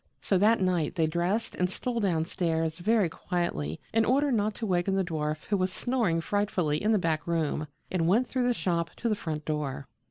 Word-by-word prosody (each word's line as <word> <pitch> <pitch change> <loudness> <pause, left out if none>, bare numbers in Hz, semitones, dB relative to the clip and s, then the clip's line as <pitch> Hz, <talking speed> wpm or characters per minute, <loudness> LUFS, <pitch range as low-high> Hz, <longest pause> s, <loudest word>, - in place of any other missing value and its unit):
So 190 - +1
that 220 +3 +4
night 180 -4 +1
they 165 - +2
dressed 175 +8 -1
and 180 0 0
stole 235 +5 -3
down 170 -6 +1
stairs 165 -2 -1
very 210 +1 +3
quietly 160 - -3
in 225 0 +4
order 275 +5 +2
not 215 -2 +1
to 230 - -4
waken 185 0 +1
the 195 - +2
dwarf 155 -3 -2
who 205 - +1
was 185 0 0
snoring 225 -9 0
frightfully 180 -6 0
in 215 - +2
the 215 - +4
back 160 -4 -1
room, 155 -2 0 0.2
and 170 -3 +1
went 220 +8 +4
through 250 0 0
the 245 - +3
shop 170 -4 0
to 240 - -2
the 215 - +2
front 155 -5 -4
door. 145 -3 -2
180 Hz, 210 wpm, -28 LUFS, 160-210 Hz, 0.2 s, that